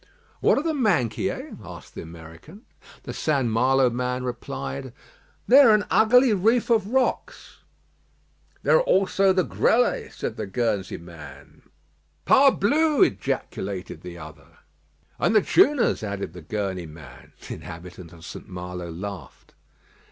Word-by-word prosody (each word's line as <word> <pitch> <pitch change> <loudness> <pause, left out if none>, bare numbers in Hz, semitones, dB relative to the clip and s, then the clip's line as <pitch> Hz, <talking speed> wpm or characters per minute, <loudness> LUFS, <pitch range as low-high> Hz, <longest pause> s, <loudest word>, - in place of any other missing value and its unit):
"What - - +3
are 280 - 0
the 325 -1 -1
Minquiers?" 200 - -1
asked 90 -3 -11
the - - -7
American. 85 - -13 0.4
The - - -7
St. 140 -5 0
Malo 125 +3 +2
man 125 +1 -2
replied: 70 - -6 0.5
"They 265 +4 +7
are 235 -6 +7
an 210 - 0
ugly 250 +2 +5
reef 225 +5 +1
of 220 -4 +2
rocks." 255 +3 -2 1.0
"There - - +5
are - - +3
also 195 - +2
the 185 -1 +2
Grelets," 245 +7 +1
said - - -5
the - - -4
Guernsey 100 -3 -2
man. 75 -5 -14 0.6
"Parblus!" 280 +3 +4
ejaculated 95 0 -4
the 85 -1 -9
other. 80 -1 -13 0.6
"And 220 - +1
the 215 - +5
Chouas," 295 -8 +3
added 100 -5 -5
the 90 - -10
Guernsey 95 -1 -4
man. 75 -5 -14
The - - -5
inhabitant 85 +1 -10
of 85 -1 -14
St. - - -10
Malo 90 -1 -7
laughed. 90 -3 -9
120 Hz, 135 wpm, -24 LUFS, -, 1.0 s, They